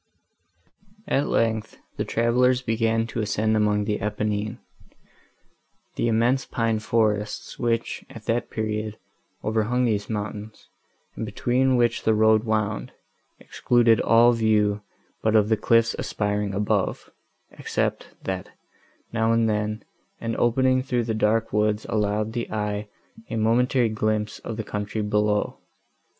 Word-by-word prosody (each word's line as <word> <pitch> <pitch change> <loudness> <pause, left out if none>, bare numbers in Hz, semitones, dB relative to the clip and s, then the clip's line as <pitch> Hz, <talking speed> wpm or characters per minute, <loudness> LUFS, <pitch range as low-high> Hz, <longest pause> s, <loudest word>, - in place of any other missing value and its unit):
At 140 - +1
length, 110 -1 0 0.2
the - - 0
travellers 125 +2 +2
began 115 -1 +1
to 115 0 -5
ascend 110 +1 0
among 105 -1 +2
the 105 0 -2
Apennines. 105 +1 -2 1.4
The - - 0
immense 120 +4 +2
pine 115 -3 -1
forests, 105 -2 -1
which, 115 -1 -1
at 115 - -11
that 115 +1 -1
period, 110 -1 -3 0.5
overhung 110 +3 +1
these 105 -3 -1
mountains, 105 0 -5 0.5
and - - -4
between 130 +1 +1
which 120 -1 +2
the 110 - +2
road 110 +1 +4
wound, 110 -1 -1 0.5
excluded 120 -2 +2
all 115 +1 +5
view 105 -3 +2 0.4
but 110 0 +2
of 105 -1 +4
the 110 - +4
cliffs 115 +1 +3
aspiring 105 -1 -2
above, 105 -1 -1 0.4
except, - - -2 0.2
that, 95 -1 -4 0.6
now 115 0 +2
and 115 0 +3
then, 105 0 -1 0.4
an 115 0 -3
opening 130 +2 +3
through 125 -2 -1
the 110 0 -2
dark 110 +1 +1
woods 105 0 +1
allowed 105 +1 0
the 120 -1 -4
eye 105 -1 -2 0.4
a - - -3
momentary 120 +2 +2
glimpse 110 0 -1
of 115 - -6
the 110 - -3
country 105 +1 -3
below. 105 0 0
110 Hz, 130 wpm, -24 LUFS, 105-115 Hz, 1.4 s, all